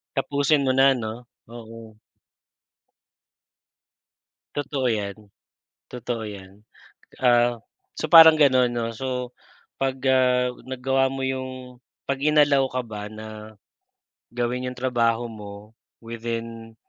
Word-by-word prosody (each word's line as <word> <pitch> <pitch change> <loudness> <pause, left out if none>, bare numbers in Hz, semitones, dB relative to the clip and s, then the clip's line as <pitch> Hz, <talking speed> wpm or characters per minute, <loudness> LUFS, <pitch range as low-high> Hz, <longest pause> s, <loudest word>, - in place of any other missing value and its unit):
Tapusin 140 +1 +1
mo 130 - +3
na, 135 +1 +5
'no? 115 -1 -5 0.3
Oo. 115 -2 -12 2.6
Totoo 140 -2 -2
yan. 100 -3 -3 0.8
Totoo 120 -2 -4
yan. 100 -1 -10 0.5
Ah, 120 -1 +3 0.4
so - - -2
parang 160 0 +9
gano'n, 130 -4 +4
'no? 115 -1 -3
So 125 +1 -4 0.5
pag, 135 -1 0
ah, 125 -1 +2
nagawa 130 +1 0
mo 135 0 -4
yung 130 -1 -6 0.2
'pag 135 0 -3
in-allow 145 -2 +3
ka 130 -1 -3
ba 105 -2 -7
na, 110 0 -10 0.8
gawin 125 +1 -2
'yong 125 - -5
trabaho 120 -2 0
mo 105 -1 -11 0.3
within 115 0 -6
125 Hz, 105 wpm, -24 LUFS, 115-130 Hz, 2.6 s, parang